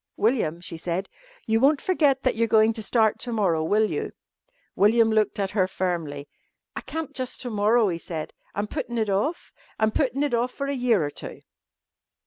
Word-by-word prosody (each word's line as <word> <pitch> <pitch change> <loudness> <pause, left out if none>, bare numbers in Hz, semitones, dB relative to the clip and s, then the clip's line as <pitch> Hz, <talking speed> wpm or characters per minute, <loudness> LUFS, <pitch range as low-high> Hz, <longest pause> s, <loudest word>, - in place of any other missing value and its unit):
"William," 210 -8 +1
she 170 -1 -7
said. 175 +3 -3 0.4
"You 225 0 +2
won't 280 +3 +4
forget 290 -7 +2
that 255 - +1
you're 230 +1 +1
going 220 0 +4
to 220 - -4
start 220 +1 +2
to 245 - -3
morrow, 185 -8 +1
will 215 +6 +2
you?" - - -3 0.6
William 225 +2 +4
looked 215 -1 +1
at 195 -1 -1
her 190 -3 +2
firmly. 165 -7 -3 0.5
"I - - -4
can't 320 -2 -5
jus' 255 -1 -4
to 245 - -5
morrow," 215 +2 +3
he 170 -3 -2
said. 160 -2 -6 0.2
"I'm 205 - -1
puttin' 240 0 -4
it 215 -3 0
off. 280 - -1 0.3
I'm 220 0 +3
puttin' 275 +3 0
it 290 - -1
off 240 +2 +1
for 275 - -4
a 280 - -2
year 240 - +2
or 145 - -4
two." - - -9
220 Hz, 195 wpm, -25 LUFS, 190-250 Hz, 0.6 s, won't